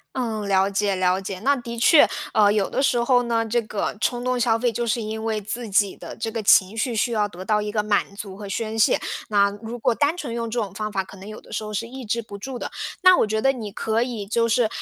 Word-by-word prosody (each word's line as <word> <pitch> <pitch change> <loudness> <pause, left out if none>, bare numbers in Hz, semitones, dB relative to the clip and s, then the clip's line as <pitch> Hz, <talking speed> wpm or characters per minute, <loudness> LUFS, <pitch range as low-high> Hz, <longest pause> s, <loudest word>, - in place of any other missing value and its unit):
嗯， 220 -5 -2
了 195 0 +3
解 200 0 0
了 185 0 +1
解。 190 -1 -5
那 280 +5 +3
的 235 -2 -6
确， 290 +6 +6 0.3
呃， 205 -2 +5
有 205 -2 +1
的 - - -1
时 270 -3 +2
候 245 0 +4
呢， 230 -1 0
这 235 +2 +1
个 215 -2 -3
冲 245 0 0
动 255 0 0
消 230 -2 +3
费 240 +1 +1
就 235 +2 -2
是 230 +1 0
因 220 0 -4
为 220 -1 -1
自 220 +3 -5
己 195 0 +2
的 - - -9
这 225 0 -3
个 225 - -3
情 195 0 +5
绪 235 +1 -1
需 235 +2 +1
要 210 -2 +1
得 185 -2 -10
到 210 0 +2
一 210 - -3
个 210 -1 0
满 205 -1 0
足 200 -2 -7
和 200 -1 -8
宣 220 +2 -3
泄， 220 - +4 0.3
那 200 -1 +3
如 230 +2 -6
果 230 - +1
单 295 +7 +1
纯 265 -9 -5
用 230 -1 -3
这 240 - -2
种 205 -3 -3
方 215 +1 -4
法， 195 -1 -1
可 190 - -14
能 195 +3 -10
有 215 - -8
的 - - -18
时 - - -2
候 215 - -6
是 230 +3 -2
抑 260 0 -8
制 235 +2 -1
不 205 -2 -9
住 260 +4 -6
的。 - - -5 0.3
那 370 -1 +8
我 - - +2
觉 220 +1 0
得 270 +5 +3
你 225 -6 -6
可 220 +3 -1
以 235 -4 -3
就 230 +3 +1
是 235 -1 +3
220 Hz, 295 characters per minute, -23 LUFS, 205-235 Hz, 0.3 s, 那